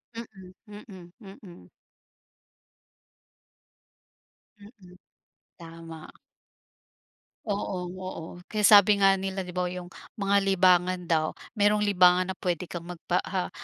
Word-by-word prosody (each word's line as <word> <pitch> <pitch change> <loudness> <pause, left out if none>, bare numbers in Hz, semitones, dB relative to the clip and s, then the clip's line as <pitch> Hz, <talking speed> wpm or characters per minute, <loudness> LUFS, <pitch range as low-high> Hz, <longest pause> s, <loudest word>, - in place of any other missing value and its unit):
Mm, 195 -5 -11 0.2
mm, 195 -4 -13 0.3
mm. 170 - -15 2.9
Mm, 200 -4 -17 0.6
tama. 165 -1 -11 1.4
Oo, 200 -3 -3 0.2
oo. 185 -3 -7 0.3
Kaya 210 -1 0
sabi 205 -1 +7
nga 195 -1 +4
nila 190 -1 -4
'di 180 - -9
ba, 180 -1 -2
yung 180 0 -8 0.3
mga 200 0 +1
libangan 185 -1 +2
daw 160 -2 +1 0.3
merong 210 -1 +2
libangan 185 -1 +3
na - - -24
puwede 180 -1 -3
kang 170 0 -8
magpa, 180 +1 -2
ah, 185 -1 -4
185 Hz, 105 wpm, -26 LUFS, 175-200 Hz, 2.9 s, sabi